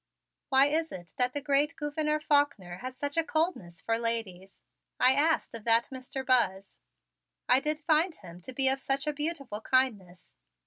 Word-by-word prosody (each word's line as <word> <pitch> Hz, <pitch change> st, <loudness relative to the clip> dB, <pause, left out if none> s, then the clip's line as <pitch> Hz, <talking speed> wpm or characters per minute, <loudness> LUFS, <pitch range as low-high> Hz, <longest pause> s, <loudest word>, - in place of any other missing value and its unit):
"Why 270 Hz, 0 st, +5 dB
is 320 Hz, +3 st, -1 dB
it 175 Hz, -2 st, -9 dB
that 250 Hz, 0 st, +1 dB
the 290 Hz, -, -3 dB
great 290 Hz, +2 st, +2 dB
Gouverneur 300 Hz, 0 st, -2 dB
Faulkner 285 Hz, -13 st, 0 dB
has 255 Hz, +4 st, -8 dB
such 285 Hz, +3 st, -4 dB
a 330 Hz, -, +3 dB
coldness 310 Hz, -, -2 dB
for 225 Hz, 0 st, 0 dB
ladies?" 210 Hz, -5 st, -4 dB, 0.4 s
I 255 Hz, -, +6 dB
asked 310 Hz, +2 st, +1 dB
of 230 Hz, -2 st, -6 dB
that 230 Hz, 0 st, +4 dB
Mr. 260 Hz, 0 st, -6 dB
Buzz. 200 Hz, -7 st, 0 dB, 0.7 s
"I 250 Hz, +1 st, +5 dB
did 300 Hz, +2 st, -2 dB
find 315 Hz, +3 st, +2 dB
him 175 Hz, -2 st, -13 dB
to 260 Hz, -, -9 dB
be 265 Hz, +1 st, +3 dB
of 265 Hz, 0 st, +2 dB
such 275 Hz, +2 st, -1 dB
a 300 Hz, -, -1 dB
beautiful 290 Hz, -7 st, -4 dB
kindness." 215 Hz, -9 st, -1 dB
265 Hz, 175 wpm, -29 LUFS, 225-295 Hz, 0.7 s, I